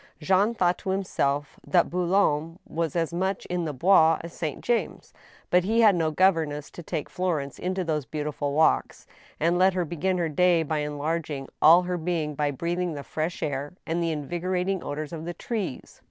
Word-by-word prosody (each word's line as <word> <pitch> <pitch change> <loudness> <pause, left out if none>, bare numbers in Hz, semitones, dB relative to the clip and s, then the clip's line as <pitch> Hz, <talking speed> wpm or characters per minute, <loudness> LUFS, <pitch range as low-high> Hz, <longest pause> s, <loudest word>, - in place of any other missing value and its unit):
Jean 195 +8 +2
thought 180 -3 +1
to 195 - -5
himself 145 -7 -1
that 175 -2 +2
Boulogne 170 -3 +1
was 165 -1 -3
as 165 -1 0
much 190 +2 -1
in 180 -1 -1
the 155 - -2
Bois 165 +2 +5
as 170 0 -9
Saint 155 -4 -4
James; 240 -1 -2 0.4
but 180 0 +4
he 225 +5 +2
had 210 -4 +6
no 165 -2 +1
governess 155 -4 +1
to - - -9
take 160 -2 -4
Florence 160 -7 -2
into 185 +1 -2
those 155 -4 -1
beautiful 150 -2 -3
walks, 160 +2 +2 0.3
and 170 +3 +2
let 185 0 +4
her 180 -2 0
begin 180 +4 -1
her 170 -2 0
day 170 +2 +3
by 155 0 -1
enlarging 150 -1 -3
all 170 +4 +7
her 180 0 -2
being 160 -3 -2
by 145 0 0
breathing 170 +4 -2
the 140 - -6
fresh 160 +4 -3
air 145 0 -3
and 165 +2 -1
the 165 - 0
invigorating 180 +5 -2
odors 150 +2 -5
of 160 -1 -5
the 175 0 -5
trees. 210 - -5
170 Hz, 185 wpm, -26 LUFS, 150-180 Hz, 0.4 s, all